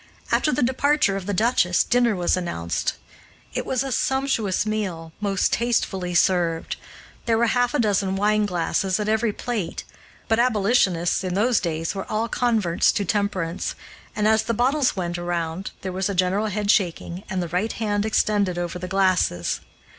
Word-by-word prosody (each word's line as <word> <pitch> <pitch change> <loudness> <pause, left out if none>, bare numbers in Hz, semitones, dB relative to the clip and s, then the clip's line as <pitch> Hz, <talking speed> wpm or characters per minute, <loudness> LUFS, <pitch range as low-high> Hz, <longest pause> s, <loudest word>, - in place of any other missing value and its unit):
After 305 - +2
the 250 - +1
departure 260 -3 +2
of 195 -1 -5
the - - 0
duchess, 185 -4 +2
dinner 240 -3 +2
was 180 0 +1
announced. 85 - -2 0.6
It - - -3
was 260 -1 0
a 270 - -4
sumptuous 260 -7 0
meal, 190 -7 -3
most 200 -2 +1
tastefully 190 -6 0
served. 175 -3 +1 0.5
There 225 -1 +3
were 235 - +3
half 245 +1 +1
a - - +1
dozen 200 -4 +1
wineglasses 195 -2 +1
at 210 - -2
every 220 +1 +1
plate, 220 -4 -4 0.4
but 225 +1 +2
abolitionists, 200 -7 +2
in 185 -1 -2
those 230 +3 +3
days, 165 -2 -2
were 195 -1 -6
all 220 +2 0
converts 220 -8 +2
to 200 - -1
temperance, 195 -4 -1 0.4
and, 210 0 +1
as 220 0 +4
the 230 +1 -2
bottles 260 +3 +2
went 175 -2 -3
around 175 +1 -3
there 190 - -3
was 190 +2 -1
a 200 - -2
general 185 +4 +1
headshaking, 195 -4 0
and 190 -1 -2
the 170 - -5
right 185 +6 -1
hand 205 -2 -1
extended 205 -4 +1
over 175 0 -3
the 180 - -5
glasses. 185 - +1
200 Hz, 165 wpm, -23 LUFS, 180-225 Hz, 0.6 s, as